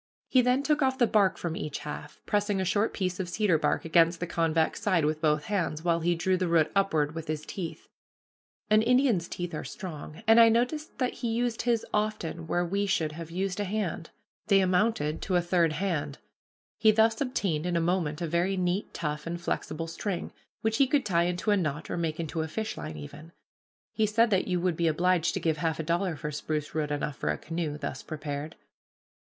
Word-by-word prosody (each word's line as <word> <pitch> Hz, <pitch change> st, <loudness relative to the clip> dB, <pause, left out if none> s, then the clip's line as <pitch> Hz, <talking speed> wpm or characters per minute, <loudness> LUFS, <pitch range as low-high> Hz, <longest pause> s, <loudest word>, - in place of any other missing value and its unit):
He 255 Hz, -, +5 dB
then 250 Hz, +3 st, +2 dB
took 300 Hz, 0 st, +1 dB
off 260 Hz, -1 st, +2 dB
the 245 Hz, -, +5 dB
bark 205 Hz, -4 st, +3 dB
from 170 Hz, -2 st, -3 dB
each 150 Hz, -3 st, -4 dB
half, 150 Hz, 0 st, -7 dB
pressing 205 Hz, -1 st, +1 dB
a 190 Hz, -, 0 dB
short 205 Hz, +5 st, +1 dB
piece 185 Hz, -2 st, -2 dB
of 180 Hz, -2 st, -3 dB
cedar 185 Hz, -4 st, +2 dB
bark -, -, 0 dB
against 165 Hz, +1 st, +4 dB
the 175 Hz, -, -2 dB
convex 165 Hz, 0 st, 0 dB
side 185 Hz, -8 st, +2 dB
with 155 Hz, +1 st, -1 dB
both 150 Hz, -2 st, +2 dB
hands, 170 Hz, -6 st, -2 dB
while 170 Hz, -1 st, +2 dB
he 170 Hz, +1 st, +1 dB
drew 185 Hz, +3 st, +1 dB
the 185 Hz, 0 st, 0 dB
root 160 Hz, -2 st, +3 dB
upward 160 Hz, -7 st, +2 dB
with 165 Hz, 0 st, -6 dB
his 155 Hz, 0 st, -3 dB
teeth. 175 Hz, -4 st, -6 dB, 0.8 s
An 215 Hz, 0 st, +5 dB
Indian's 240 Hz, -7 st, +3 dB
teeth 175 Hz, -1 st, -5 dB
are 155 Hz, -, -4 dB
strong, 160 Hz, -1 st, -8 dB
and 225 Hz, +1 st, +7 dB
I 230 Hz, -1 st, +8 dB
noticed 250 Hz, +7 st, 0 dB
that 255 Hz, -2 st, 0 dB
he 240 Hz, -, -4 dB
used 230 Hz, 0 st, 0 dB
his 235 Hz, -2 st, +1 dB
often 170 Hz, -6 st, -2 dB
where 175 Hz, +1 st, +1 dB
we 200 Hz, +3 st, -1 dB
should 160 Hz, -5 st, +1 dB
have 165 Hz, +1 st, -8 dB
used 190 Hz, +3 st, -2 dB
a -, -, +1 dB
hand. 190 Hz, -5 st, -3 dB, 0.4 s
They 200 Hz, -2 st, +5 dB
amounted 185 Hz, -4 st, +1 dB
to 185 Hz, -, -1 dB
a -, -, +5 dB
third 170 Hz, -2 st, +2 dB
hand. 155 Hz, -5 st, -2 dB, 0.6 s
He 220 Hz, -, +5 dB
thus 220 Hz, +2 st, +3 dB
obtained 195 Hz, -, -1 dB
in 175 Hz, -, -1 dB
a -, -, +3 dB
moment 170 Hz, -2 st, 0 dB
a -, -, -1 dB
very 175 Hz, +4 st, +1 dB
neat, 180 Hz, +2 st, -1 dB
tough, 150 Hz, 0 st, -3 dB
and 170 Hz, +1 st, -3 dB
flexible 165 Hz, -1 st, -3 dB
string, 175 Hz, +2 st, -4 dB, 0.3 s
which 220 Hz, 0 st, 0 dB
he 275 Hz, -, +4 dB
could 280 Hz, -1 st, +1 dB
tie 170 Hz, -4 st, +2 dB
into 180 Hz, +4 st, 0 dB
a 205 Hz, -, +4 dB
knot, 150 Hz, -4 st, -2 dB
or -, -, -1 dB
make 160 Hz, -1 st, -2 dB
into 160 Hz, 0 st, -2 dB
a 160 Hz, -, -2 dB
fishline 215 Hz, -4 st, -5 dB
even. 150 Hz, +3 st, -10 dB, 0.6 s
He 220 Hz, -1 st, +2 dB
said 225 Hz, +2 st, +3 dB
that 190 Hz, -2 st, +2 dB
you 180 Hz, -2 st, 0 dB
would 175 Hz, -1 st, 0 dB
be 170 Hz, -, +2 dB
obliged 170 Hz, +1 st, +2 dB
to -, -, 0 dB
give 160 Hz, -2 st, 0 dB
half 160 Hz, 0 st, -1 dB
a -, -, -1 dB
dollar 170 Hz, +2 st, 0 dB
for 150 Hz, 0 st, -5 dB
spruce 150 Hz, 0 st, -3 dB
root 150 Hz, -1 st, -1 dB
enough 145 Hz, 0 st, -2 dB
for -, -, -2 dB
a -, -, 0 dB
canoe, 165 Hz, -3 st, -3 dB
thus 130 Hz, -, -5 dB
prepared. 150 Hz, 0 st, -5 dB
175 Hz, 215 wpm, -28 LUFS, 160-205 Hz, 0.8 s, I